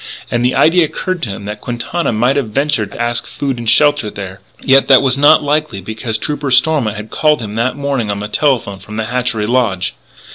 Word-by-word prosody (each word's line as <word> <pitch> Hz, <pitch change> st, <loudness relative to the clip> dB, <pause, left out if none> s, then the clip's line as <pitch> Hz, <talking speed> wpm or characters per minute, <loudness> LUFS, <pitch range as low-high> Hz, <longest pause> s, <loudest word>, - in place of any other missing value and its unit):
And 120 Hz, 0 st, 0 dB
the 125 Hz, +1 st, +1 dB
idea 170 Hz, +2 st, +4 dB
occurred 185 Hz, +3 st, -4 dB
to 115 Hz, -, -2 dB
him 100 Hz, +1 st, -6 dB
that 105 Hz, 0 st, -6 dB
Quintana 120 Hz, +8 st, -3 dB
might 120 Hz, +5 st, +1 dB
have 140 Hz, -6 st, -1 dB
ventured 135 Hz, -4 st, -1 dB
to -, -, -10 dB
ask 120 Hz, 0 st, -1 dB
food 135 Hz, -4 st, -4 dB
and 115 Hz, -2 st, -2 dB
shelter 145 Hz, -6 st, +3 dB
there. 95 Hz, -2 st, -8 dB, 0.2 s
Yet, 135 Hz, 0 st, +4 dB
that 135 Hz, -1 st, +6 dB
was 130 Hz, -1 st, +3 dB
not 145 Hz, +2 st, +5 dB
likely 150 Hz, -6 st, -1 dB
because 110 Hz, +3 st, -4 dB
Trooper 145 Hz, -1 st, -3 dB
Stormont 130 Hz, -4 st, +2 dB
had 105 Hz, +1 st, -8 dB
called 150 Hz, -2 st, +2 dB
him 105 Hz, -3 st, -6 dB
that 120 Hz, +4 st, -1 dB
morning 140 Hz, -6 st, -2 dB
on 100 Hz, -, -2 dB
the 105 Hz, +1 st, -5 dB
telephone 115 Hz, -5 st, 0 dB
from 105 Hz, +3 st, -9 dB
the 110 Hz, -, -2 dB
Hatchery 120 Hz, -2 st, -1 dB
Lodge. 110 Hz, -6 st, 0 dB
120 Hz, 215 wpm, -15 LUFS, 110-140 Hz, 0.2 s, that